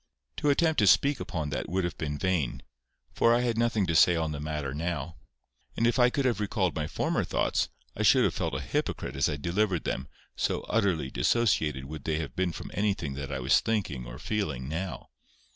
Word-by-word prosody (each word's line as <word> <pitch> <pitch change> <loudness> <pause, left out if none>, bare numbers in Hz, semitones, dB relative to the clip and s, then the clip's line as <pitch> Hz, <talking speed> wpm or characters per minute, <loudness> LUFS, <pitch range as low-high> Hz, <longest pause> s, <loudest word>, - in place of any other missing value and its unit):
To 150 - +1
attempt 160 +2 +3
to 105 - +4
speak 140 +6 +4
upon 75 -4 -3
that 75 - -3
would 95 +2 0
have 85 - -2
been 75 -2 -3
vain, 90 -7 -1 0.5
for 115 0 +4
I 120 - +2
had 120 -2 0
nothing 115 -3 +1
to 85 - -1
say 85 +2 +6
on 80 -1 -1
the 75 - -4
matter 75 -2 -3
now. 85 +2 -3 0.6
And 115 - +2
if 120 +2 +2
I 125 0 +6
could 135 +2 -1
have 120 -4 +1
recalled 100 -4 0
my 75 -1 -2
former - - 0
thoughts, - - 0 0.3
I - - -3
should - - +5
have - - +2
felt - - -2
a - - -2
hypocrite - - -2
as - - +2
I 75 - -2
delivered 90 +2 0
them, 65 +1 -3 0.3
so - - 0
utterly 90 -11 0
dissociated 80 - +1
would 75 0 -8
they 80 -1 0
have 75 -5 -5
been 90 -1 0
from - - -8
anything 100 -8 -1
that 70 0 -6
I 70 - -2
was 65 +3 +4
thinking 85 - -2
or - - -8
feeling 75 - -2
now. 80 +3 -5
85 Hz, 210 wpm, -28 LUFS, 75-110 Hz, 0.6 s, say